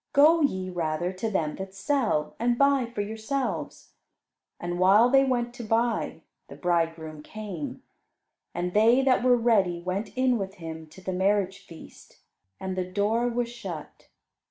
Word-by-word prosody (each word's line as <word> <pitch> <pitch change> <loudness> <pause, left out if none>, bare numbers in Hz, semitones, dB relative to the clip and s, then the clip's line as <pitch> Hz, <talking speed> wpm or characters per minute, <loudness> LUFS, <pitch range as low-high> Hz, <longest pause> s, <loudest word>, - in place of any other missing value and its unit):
Go 315 +4 +6
ye, 185 -10 0
rather, 175 +1 -2
to 205 +4 -3
them 160 -7 -1
that 190 0 -7
sell, 195 - 0
and 240 +1 +1
buy 280 -2 +3
for 230 -3 -4
yourselves." 220 +6 -4 0.7
And 175 0 -4
while 205 +6 +6
they 270 0 +6
went 240 -2 0
to 245 -1 -8
buy, 225 -5 0 0.3
the 140 - -10
bridegroom 165 -1 -1
came, 195 -4 -7 0.7
and 180 +1 -3
they 230 +5 +5
that 255 -2 +3
were 250 -1 +5
ready 205 -7 +2
went 185 +4 -3
in 255 -2 +2
with 195 0 -5
him 160 -3 -8
to 190 - -15
the 185 - -3
marriage 195 +1 +1
feast, 165 - -14 0.4
and 190 -1 -4
the 185 0 -3
door 215 +5 +1
was 240 0 -1
shut. 185 -10 -8
200 Hz, 155 wpm, -27 LUFS, 175-240 Hz, 0.7 s, Go